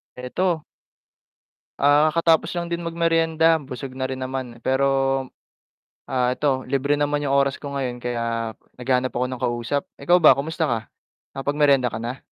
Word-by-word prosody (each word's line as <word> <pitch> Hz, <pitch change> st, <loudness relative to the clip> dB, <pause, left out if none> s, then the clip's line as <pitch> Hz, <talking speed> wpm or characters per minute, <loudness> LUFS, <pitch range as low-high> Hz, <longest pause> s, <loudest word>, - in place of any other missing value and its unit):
Eto. 160 Hz, +6 st, -2 dB, 1.1 s
Ah, 145 Hz, +2 st, +4 dB
katatapos 165 Hz, 0 st, +2 dB
lang 170 Hz, 0 st, -3 dB
din 170 Hz, -, -1 dB
mag-meryenda, 165 Hz, -1 st, +2 dB
busog 130 Hz, +1 st, -6 dB
na 130 Hz, 0 st, -3 dB
rin 130 Hz, 0 st, -5 dB
naman 130 Hz, -3 st, -6 dB
pero, 130 Hz, +1 st, +2 dB, 1.2 s
ah, 125 Hz, -2 st, +1 dB
eto 130 Hz, -1 st, 0 dB
libre 140 Hz, +2 st, +1 dB
naman 145 Hz, 0 st, 0 dB
yung 135 Hz, -, +1 dB
oras 140 Hz, -1 st, +2 dB
ko 140 Hz, -1 st, -6 dB
ngayon 125 Hz, -3 st, -3 dB
kaya 115 Hz, -2 st, -3 dB, 0.2 s
naghahanap 125 Hz, 0 st, 0 dB
ako 125 Hz, +1 st, 0 dB
ng 130 Hz, -1 st, -6 dB
kausap. 120 Hz, +4 st, -1 dB, 0.2 s
Ikaw 175 Hz, +6 st, +4 dB
ba -, -, +10 dB
kamusta 160 Hz, +3 st, -2 dB
ka 120 Hz, -6 st, 0 dB, 0.6 s
nakapag-meryenda 140 Hz, -2 st, +2 dB
ka 110 Hz, -, -4 dB
na? 125 Hz, +3 st, -4 dB
135 Hz, 150 wpm, -23 LUFS, 125-150 Hz, 1.2 s, ba